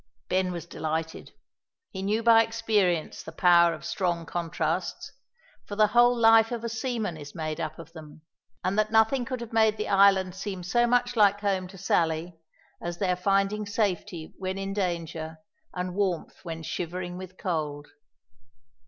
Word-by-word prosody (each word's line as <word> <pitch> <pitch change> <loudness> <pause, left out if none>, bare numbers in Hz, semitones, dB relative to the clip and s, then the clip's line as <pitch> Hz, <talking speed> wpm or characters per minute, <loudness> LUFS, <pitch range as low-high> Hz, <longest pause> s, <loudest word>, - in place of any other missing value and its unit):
Ben 185 0 +1
was 170 -2 -6
delighted. 160 -1 -4 0.6
He 190 - -6
knew 210 +4 0
by 225 -1 +7
experience 220 -7 0
the 160 - -9
power 170 0 +5
of - - -7
strong 175 -3 -1
contrasts, 165 0 -3 0.6
for 205 - -5
the 215 +1 +5
whole 240 0 +5
life 225 0 +6
of 235 -1 -4
a 235 - -2
seaman 225 -6 -3
is 145 -1 -10
made 155 -1 -3
up 155 -1 -4
of 165 0 -12
them, 155 -1 -12 0.4
and 190 +3 0
that 215 0 +1
nothing 225 +3 +3
could 255 -1 -4
have 235 -1 -8
made 220 -1 +3
the 210 - -3
island 195 -2 +4
seem 190 -1 -5
so 240 +7 +2
much 245 0 +1
like 205 -2 +4
home 190 -3 0
to 190 +1 -13
Sally, 165 -2 0 0.5
as 175 0 -4
there 180 -2 +1
finding 195 +3 0
safety 185 -6 -2
when 190 0 -3
in 195 0 -3
danger, 165 -4 -3 0.3
and 180 0 -4
warmth 185 -4 -2
when 165 -2 -6
shivering 175 +2 -4
with 185 0 -10
cold. 150 -5 -3
185 Hz, 165 wpm, -27 LUFS, 170-215 Hz, 0.6 s, by